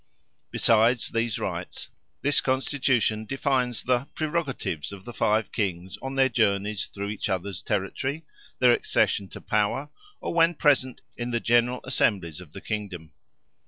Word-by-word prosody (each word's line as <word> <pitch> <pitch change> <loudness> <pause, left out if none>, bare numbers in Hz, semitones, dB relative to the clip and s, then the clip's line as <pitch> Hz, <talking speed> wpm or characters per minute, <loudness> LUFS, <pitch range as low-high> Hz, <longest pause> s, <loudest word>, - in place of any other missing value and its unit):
Besides 115 +2 +3
these 115 -1 0
rights, - - -4 0.3
this 145 +1 +3
constitution 130 -4 +1
defines 130 -2 0
the 125 +1 +1
"prerogatives" 150 - -2
of 100 0 -10
the 120 - -7
five 110 0 +1
Kings 95 -4 -2
on 135 0 -4
their 135 -1 +5
journeys 105 -4 +1
through 100 0 -5
each 105 0 -3
other's 95 +1 -2
territory, 130 - -2 0.3
their 125 -1 +6
accession 100 -4 +2
to - - -10
power, 110 +7 0 0.3
or - - -3
when 165 0 +4
present 135 -4 +2 0.2
in 120 0 -3
the 120 -1 0
General 120 +2 +2
Assemblies 85 -7 0
of - - -13
the - - -9
Kingdom. 100 -7 -5
120 Hz, 145 wpm, -26 LUFS, 100-130 Hz, 0.3 s, their